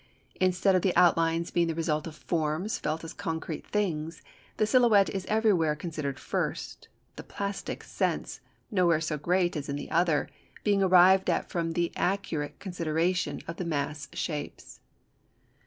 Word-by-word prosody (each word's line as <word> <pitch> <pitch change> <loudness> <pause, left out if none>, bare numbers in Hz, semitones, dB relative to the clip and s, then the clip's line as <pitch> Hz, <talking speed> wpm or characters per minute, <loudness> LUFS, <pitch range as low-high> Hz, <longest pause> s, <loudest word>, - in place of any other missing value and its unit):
Instead 185 +1 +3
of 185 - +3
the 185 -1 +1
outlines 165 -1 +3
being 170 -1 +2
the 165 - -2
result 155 -1 -1
of 160 - -8
forms 160 +5 -2
felt 155 +2 -2
as 165 - -7
concrete 160 -1 -5
things, 165 -6 -2 0.3
the 215 - +3
silhouette 220 -3 +4
is 190 -1 -4
everywhere 200 -8 +2
considered 150 -4 -4
first, - - -3 0.3
the - - -7
plastic 200 0 -5
sense - - -2 0.3
(nowhere 175 -5 +3
so 155 -1 -2
great 175 +4 +1
as 145 -1 -4
in 140 - -2
the 145 - -6
other) 165 -2 +2 0.4
being 200 -2 +2
arrived 185 0 +6
at - - -1
from 165 -1 -1
the 170 0 0
accurate 175 -6 -2
consideration 175 -1 -1
of 170 - -6
the - - -3
mass 145 -3 -3
shapes. 150 -3 -5
170 Hz, 155 wpm, -28 LUFS, 155-185 Hz, 0.4 s, arrived